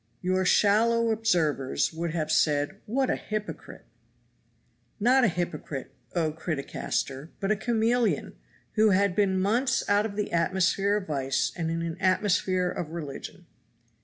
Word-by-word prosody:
Your 185 Hz, +1 st, +1 dB
shallow 225 Hz, +4 st, +3 dB
observers 160 Hz, -11 st, +1 dB
would 170 Hz, +1 st, -3 dB
have 160 Hz, -1 st, -2 dB
said, 145 Hz, +4 st, +2 dB
"What 260 Hz, +4 st, +1 dB
a -, -, +1 dB
hypocrite!" 215 Hz, 0 st, -6 dB, 1.1 s
Not 250 Hz, +5 st, +4 dB
a -, -, +6 dB
hypocrite, 165 Hz, -7 st, -4 dB, 0.2 s
oh 160 Hz, -3 st, +1 dB
Criticaster, 150 Hz, -2 st, -3 dB
but 195 Hz, +1 st, 0 dB
a -, -, +3 dB
chameleon! 225 Hz, -, 0 dB, 0.4 s
who 215 Hz, 0 st, +4 dB
had 195 Hz, -1 st, +2 dB
been 190 Hz, -2 st, +2 dB
months 245 Hz, +7 st, +1 dB
out 205 Hz, +1 st, +3 dB
of 200 Hz, -, -9 dB
the 210 Hz, 0 st, -2 dB
atmosphere 190 Hz, +4 st, +2 dB
of 205 Hz, -, -4 dB
vice 135 Hz, -4 st, -1 dB
and 165 Hz, -2 st, -2 dB
in 165 Hz, 0 st, -2 dB
an 165 Hz, 0 st, -4 dB
atmosphere 185 Hz, -1 st, +1 dB
of 160 Hz, -, -4 dB
religion. 165 Hz, +2 st, -7 dB
185 Hz, 140 wpm, -27 LUFS, 160-215 Hz, 1.1 s, a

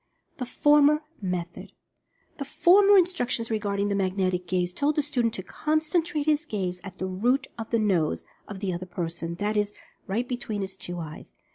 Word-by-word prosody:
THE 250 Hz, -4 st, -4 dB
FORMER 295 Hz, +3 st, +4 dB, 0.2 s
METHOD. 175 Hz, -2 st, -4 dB, 0.7 s
The -, -, -1 dB
former 395 Hz, +7 st, +6 dB
instructions 255 Hz, -11 st, +1 dB
regarding 205 Hz, -2 st, 0 dB
the 205 Hz, -, 0 dB
"Magnetic 185 Hz, -2 st, 0 dB
Gaze" 180 Hz, 0 st, 0 dB
told 290 Hz, +8 st, +1 dB
the 300 Hz, -, +2 dB
student 245 Hz, -6 st, 0 dB
to 185 Hz, -, -5 dB
concentrate 310 Hz, -, 0 dB
his 305 Hz, 0 st, +2 dB
gaze 185 Hz, -, -3 dB
"at 190 Hz, -2 st, -9 dB
the 185 Hz, -, -3 dB
root 240 Hz, +9 st, +1 dB
of 225 Hz, -1 st, -6 dB
the 230 Hz, -, +2 dB
nose" 170 Hz, -, +1 dB, 0.2 s
of 200 Hz, -2 st, -8 dB
the 190 Hz, -3 st, -1 dB
other 180 Hz, +2 st, -5 dB
person, 170 Hz, -1 st, -4 dB
that 205 Hz, +4 st, -1 dB
is, 205 Hz, 0 st, 0 dB, 0.3 s
right 230 Hz, +6 st, -1 dB
between 240 Hz, -5 st, -3 dB
his 190 Hz, 0 st, -3 dB
two 175 Hz, -2 st, -6 dB
eyes. 160 Hz, -3 st, -8 dB
210 Hz, 175 wpm, -26 LUFS, 185-285 Hz, 0.7 s, former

